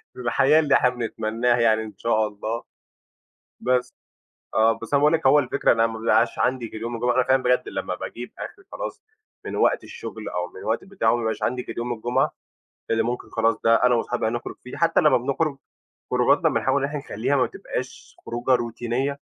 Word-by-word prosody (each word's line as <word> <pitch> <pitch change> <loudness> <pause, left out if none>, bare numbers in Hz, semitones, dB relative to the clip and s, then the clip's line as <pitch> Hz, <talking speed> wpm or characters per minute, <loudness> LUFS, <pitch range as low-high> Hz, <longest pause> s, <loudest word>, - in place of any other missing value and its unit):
للحياة 130 +5 +3
اللي 145 -3 +3
إحنا 125 - +4
بنتمنّاها 120 0 -1
يعني 110 -1 +3
إن 110 - -9
شاء 110 -1 +1
الله، 110 +3 -5 1.0
بس 125 0 0 0.6
آه، 110 +1 +4
بس 115 - -7
أنا 140 - +5
باقول 150 +2 +4
لك 160 -4 +2
هو 145 +3 +6
الفكرة 130 -4 +1
إن 115 - +1
أنا 115 - +5
ما 110 0 -6
بيبقاش 115 +1 +2
عندي 125 -2 0
غير 110 - -8
يوم 115 +1 -3
الجمعة، 120 +1 0
أنا 130 - +4
فعلًا 130 0 +2
بجد 125 0 +2
لمّا - - -3
باجيب 120 +1 -7
آخري 385 - -8
خلاص - - -6 0.4
من - - -4
وقت - - +2
الشُغل 435 - -7
أو 90 0 -3
من 90 - -15
الوقت 110 +9 -1
بتاعه 190 -13 0
ما 120 - +2
بيبقاش 110 -2 -2
عندي 125 0 -1
غير - - -7
يوم 120 +1 -2
الجمعة 120 +3 0 0.6
اللي 115 - +3
ممكن 120 +1 -4
خلاص 115 0 +1
ده 115 0 +6
أنا 125 0 +5
وأصحابي 120 0 -1
هنخرُج 120 +1 -4
فيه 125 - -9
حتّى 165 +2 +3
لمّا 150 -5 +5
بنخرُج 140 +4 -1 0.6
خروجاتنا - - +3
بنحاول 135 +1 +1
إن - - +1
إحنا 150 0 -4
نخلّيها 140 +1 -1
ما 130 - +3
تبقاش - - -7
خروجة 120 +2 -2
روتينية 120 +4 -2
120 Hz, 200 wpm, -24 LUFS, 115-135 Hz, 1.0 s, هو